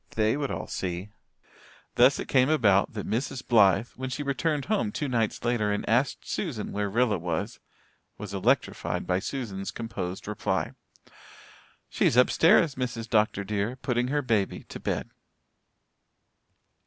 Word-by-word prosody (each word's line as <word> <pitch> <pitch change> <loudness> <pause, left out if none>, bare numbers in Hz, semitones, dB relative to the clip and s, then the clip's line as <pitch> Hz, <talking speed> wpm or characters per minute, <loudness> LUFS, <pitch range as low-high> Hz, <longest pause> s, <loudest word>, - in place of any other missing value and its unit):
They 110 +1 +2
would 140 -2 -2
all - - -4
see! 90 +2 -4 0.8
Thus 125 +3 +5
it - - -5
came 130 0 +3
about 105 -12 +3
that 105 -3 -5
Mrs. 130 +3 -3
Blythe, 105 -1 +4
when 130 0 -6
she 145 +3 -3
returned 140 +1 -1
home 215 0 0
two 150 -7 -3
nights 115 -3 -1
later 115 -3 +1
and 105 - -2
asked 125 +4 +1
Susan 135 - -3
where 105 0 -1
Rilla 110 -2 +1
was, 85 -1 -3 0.6
was 105 -1 -7
electrified 95 - 0
by 90 0 +1
Susan's 100 -5 -4
composed 95 -6 -5
reply. 105 -1 -1 1.2
"She's 120 - +1
upstairs, 160 +5 +5
Mrs. 120 -3 -4
Dr. 105 -2 +2
dear, 105 +4 -2
putting 125 -1 -1
her 145 +2 0
baby 110 -6 0
to - - -7
bed." - - -3
115 Hz, 140 wpm, -27 LUFS, 105-130 Hz, 1.2 s, Thus